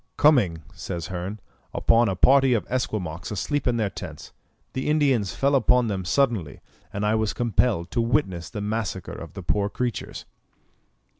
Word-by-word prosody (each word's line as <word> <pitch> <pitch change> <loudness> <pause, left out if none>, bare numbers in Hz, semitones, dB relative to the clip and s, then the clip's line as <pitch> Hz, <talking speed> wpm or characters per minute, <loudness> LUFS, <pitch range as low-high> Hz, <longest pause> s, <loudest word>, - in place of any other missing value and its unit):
"Coming," 105 - +4
says 85 0 -5
Hearn, 95 +4 -4 0.4
"upon 115 -1 +4
a 95 - -1
party 135 +5 +5
of 105 -6 -1
Esquimaux 100 -10 -2
asleep 130 +8 -2
in 120 -1 +2
their 105 -4 0
tents, - - -8 0.4
the 130 +3 -2
Indians 135 -10 +2
fell 140 +1 +2
upon 125 -2 +3
them 95 -3 -3
suddenly, 110 - 0 0.3
and 100 +1 -2
I 105 - +2
was 110 -1 +1
compelled 115 -6 0
to 120 - +1
witness 115 - 0
the 105 - -5
massacre 105 -3 -3
of - - -9
the - - -8
poor 100 -1 0
creatures." 125 +2 -4
110 Hz, 160 wpm, -25 LUFS, 95-125 Hz, 0.4 s, party